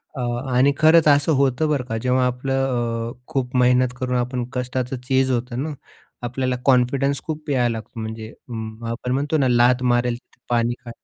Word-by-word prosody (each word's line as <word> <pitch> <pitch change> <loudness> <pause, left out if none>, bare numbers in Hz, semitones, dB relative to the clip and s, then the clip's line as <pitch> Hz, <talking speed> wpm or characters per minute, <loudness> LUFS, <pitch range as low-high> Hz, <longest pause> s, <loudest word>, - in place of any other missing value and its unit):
अ, 130 - -4 0.3
आणि 135 +3 +4
खरंच 160 0 +5
असं 145 +2 +4
होतं 140 +3 +1
बरं 145 -4 0
का, 115 -3 -3
जेव्हा 125 +2 +1
आपलं 125 -3 -1
अ, - - -10
खूप 130 -2 -3
मेहनत 125 0 +3
करून 125 -1 -1
आपण 125 0 -2
कष्टाचं 125 0 -2
चीज 130 0 +2
होतं 125 +1 -2
ना, 155 0 -4 0.5
आपल्याला 130 +1 -1
कॉन्फिडन्स 135 +2 +2
खूप 155 -1 -5
यायला 125 -4 +2
लागतो 115 +1 -8
म्हणजे 110 0 -6 0.6
आपण 125 +2 -4
म्हणतो 145 +4 0
ना, 135 -3 +2
"लात 125 +1 +4
मारेल, 120 -1 +2
तिथ 125 - -28
पाणी 120 0 +1
काढेल." 115 - -11
125 Hz, 175 wpm, -22 LUFS, 120-135 Hz, 0.6 s, खरंच